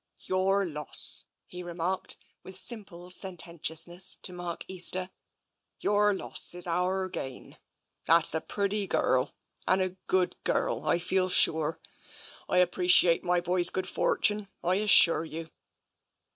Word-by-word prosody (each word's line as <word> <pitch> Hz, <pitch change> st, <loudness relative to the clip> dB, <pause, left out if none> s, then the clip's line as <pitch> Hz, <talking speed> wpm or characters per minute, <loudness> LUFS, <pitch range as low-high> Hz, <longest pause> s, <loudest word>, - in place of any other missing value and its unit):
" -, -, -52 dB
Yourr 195 Hz, +1 st, 0 dB
loss," 150 Hz, -4 st, +2 dB, 0.2 s
he 180 Hz, -, -10 dB
remarked, 175 Hz, +1 st, -4 dB, 0.2 s
with 190 Hz, 0 st, -4 dB
simple 190 Hz, -5 st, -2 dB
sententious 170 Hz, -3 st, 0 dB
ness, 180 Hz, +2 st, +2 dB
to 180 Hz, -, -5 dB
Mark 175 Hz, -1 st, -6 dB
Easter, 185 Hz, 0 st, -1 dB, 0.3 s
" -, -, -54 dB
your 205 Hz, 0 st, +2 dB
loss 190 Hz, -2 st, +1 dB
is 180 Hz, -, +6 dB
ourr 180 Hz, +2 st, -1 dB
gain. 130 Hz, -8 st, -8 dB, 0.5 s
That's 165 Hz, -2 st, +4 dB
a 160 Hz, -, -1 dB
pretty 200 Hz, 0 st, -3 dB
gurrel 130 Hz, -7 st, 0 dB, 0.3 s
and 185 Hz, -, +2 dB
a 185 Hz, 0 st, 0 dB, 0.2 s
good 185 Hz, -1 st, 0 dB
gurrel, -, -, -1 dB
I -, -, +2 dB
feel 185 Hz, +1 st, -1 dB
sure. 160 Hz, -3 st, +3 dB, 0.7 s
I 180 Hz, 0 st, +3 dB
appre 180 Hz, 0 st, -5 dB
ciate 175 Hz, -2 st, +6 dB
my 180 Hz, -1 st, 0 dB
boy's 175 Hz, 0 st, +2 dB
good 185 Hz, 0 st, -4 dB
fortune, 210 Hz, +1 st, 0 dB, 0.2 s
I 180 Hz, +2 st, 0 dB
assure 195 Hz, -6 st, +4 dB
you." 165 Hz, 0 st, -9 dB
180 Hz, 145 wpm, -27 LUFS, 170-190 Hz, 0.7 s, is